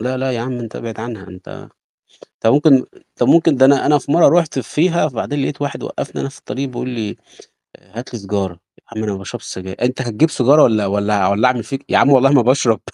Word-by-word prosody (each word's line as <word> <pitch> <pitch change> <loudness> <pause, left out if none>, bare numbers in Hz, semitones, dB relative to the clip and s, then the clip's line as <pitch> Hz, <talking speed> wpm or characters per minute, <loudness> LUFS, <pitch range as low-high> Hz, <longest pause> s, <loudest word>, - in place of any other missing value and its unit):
لا، 125 +3 -2
لا، 130 0 -2
يا 120 - -3
عم، 130 +2 -4
أنت 115 -3 -8
أبعد 115 -1 -7
عنها 110 -4 -8
أنت 90 +1 -12 0.7
طَب 115 - +3
ممكن 150 +1 +5
آآ، 130 - -4
طَب 120 - 0
ممكن 165 -2 +4
ده 130 0 +5
أنا 140 -1 +4
أنا 150 0 +4
في 140 0 -6
مرّة 170 - +5
رُحت 155 -5 -3
فيها 165 +4 0
فبعدين 140 +2 -4
لقيت 140 +1 -4
واحد 140 -1 -4
وقّفني - - -5
أنا - - -4
في 140 - -16
الطريق 135 +2 -5
بيقول 125 0 -5
لي: 110 -4 -4 0.7
"هات 120 +7 -11
لي 120 - -4
سيجارة." 100 -2 -3
"يا 95 +2 -26 0.2
عم - - -2
أنا 105 -2 -2
باشربش 95 -1 -8
سجاير." 95 0 -8
"أنت 125 +1 -1
هتجيب 120 +6 +1
سيجارة 145 +3 +4
ولّا 110 -3 +3
ولّا 100 +1 -1
أع 95 -2 +2
ولّا 105 +5 +3
أعمل 125 -2 -1
فيك." 135 0 -6
"يا - - +3
عم 140 - +4
والله 135 0 +5
ما 140 -4 +5
باشرب." 120 -3 +2
125 Hz, 235 wpm, -17 LUFS, 105-140 Hz, 0.7 s, ممكن